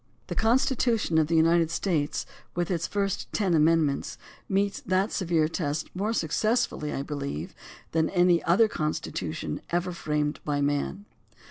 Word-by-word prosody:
The -, -, -2 dB
Constitution 230 Hz, -4 st, +2 dB
of 155 Hz, -, +2 dB
the 165 Hz, -, +1 dB
United 165 Hz, 0 st, +4 dB
States, 165 Hz, -4 st, -1 dB, 0.3 s
with 175 Hz, +1 st, -1 dB
its 165 Hz, -2 st, -1 dB
first 200 Hz, -2 st, -2 dB
ten 195 Hz, -5 st, +1 dB
Amendments, 155 Hz, -2 st, +2 dB, 0.3 s
meets 200 Hz, +1 st, 0 dB
that 185 Hz, +3 st, +1 dB
severe 165 Hz, -4 st, +1 dB
test 155 Hz, -1 st, -3 dB
more 205 Hz, +4 st, -1 dB
success 220 Hz, +6 st, +1 dB
fully, 150 Hz, -1 st, -6 dB
I 135 Hz, -, -3 dB
believe, 140 Hz, -, -5 dB, 0.4 s
than 160 Hz, 0 st, +1 dB
any 175 Hz, -2 st, +4 dB
constitution 155 Hz, -, 0 dB
ever 175 Hz, +1 st, 0 dB
framed 150 Hz, -3 st, -1 dB
by 145 Hz, -1 st, -1 dB
man. 145 Hz, +8 st, -1 dB
165 Hz, 140 wpm, -27 LUFS, 150-195 Hz, 0.4 s, United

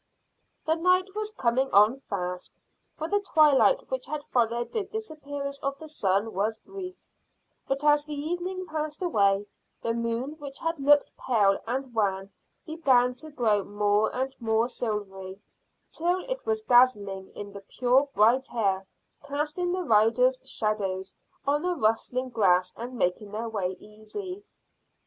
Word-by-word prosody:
The 315 Hz, -, +3 dB
night 365 Hz, +3 st, +2 dB
was 425 Hz, 0 st, -2 dB
coming 265 Hz, -, 0 dB
on 210 Hz, +6 st, +5 dB
fast, 180 Hz, -7 st, -5 dB, 0.4 s
for 315 Hz, -, -3 dB
the 410 Hz, +3 st, +2 dB
twilight 310 Hz, -, +4 dB
which -, -, -3 dB
had 305 Hz, -1 st, -4 dB
followed 235 Hz, -2 st, 0 dB
the 445 Hz, -3 st, -1 dB
disappearance 285 Hz, -9 st, -5 dB
of 275 Hz, 0 st, -3 dB
the 315 Hz, -, -10 dB
sun 205 Hz, -6 st, 0 dB
was 215 Hz, +4 st, 0 dB
brief; 370 Hz, -, -8 dB, 0.7 s
but 270 Hz, +2 st, -1 dB
as 295 Hz, 0 st, +4 dB
the 300 Hz, 0 st, -6 dB
evening 355 Hz, +5 st, -3 dB
passed 310 Hz, 0 st, -4 dB
away, 200 Hz, -, +2 dB, 0.4 s
the 230 Hz, -, 0 dB
moon 235 Hz, +5 st, -2 dB
which 280 Hz, -2 st, -7 dB
had 330 Hz, -1 st, -2 dB
looked 290 Hz, +1 st, +4 dB
pale 205 Hz, -6 st, +2 dB
and 260 Hz, +1 st, -3 dB
wan 195 Hz, -3 st, 0 dB, 0.3 s
began 265 Hz, -7 st, +3 dB
to 310 Hz, +5 st, -9 dB
grow 225 Hz, -8 st, +1 dB
more 205 Hz, +1 st, +1 dB
and 265 Hz, +1 st, -2 dB
more 225 Hz, 0 st, +2 dB
silvery, 195 Hz, -5 st, -4 dB, 0.5 s
till 355 Hz, +3 st, 0 dB
it -, -, -4 dB
was 440 Hz, -1 st, 0 dB
dazzling 205 Hz, -, +3 dB
in 205 Hz, 0 st, -7 dB
the 200 Hz, -, -8 dB
pure 255 Hz, +6 st, +2 dB
bright 235 Hz, +5 st, +3 dB
air, 195 Hz, -5 st, 0 dB, 0.4 s
casting 300 Hz, +5 st, -2 dB
the 365 Hz, 0 st, -1 dB
riders' 305 Hz, -, +3 dB
shadows 195 Hz, -3 st, -2 dB, 0.3 s
on 290 Hz, +1 st, +2 dB
the 360 Hz, +1 st, 0 dB
rustling 255 Hz, 0 st, 0 dB
grass 185 Hz, -6 st, +2 dB
and 245 Hz, +2 st, -7 dB
making 200 Hz, +2 st, 0 dB
their 220 Hz, +3 st, -4 dB
way 190 Hz, -4 st, -2 dB
easy. 365 Hz, -, -8 dB
255 Hz, 150 wpm, -27 LUFS, 210-310 Hz, 0.7 s, on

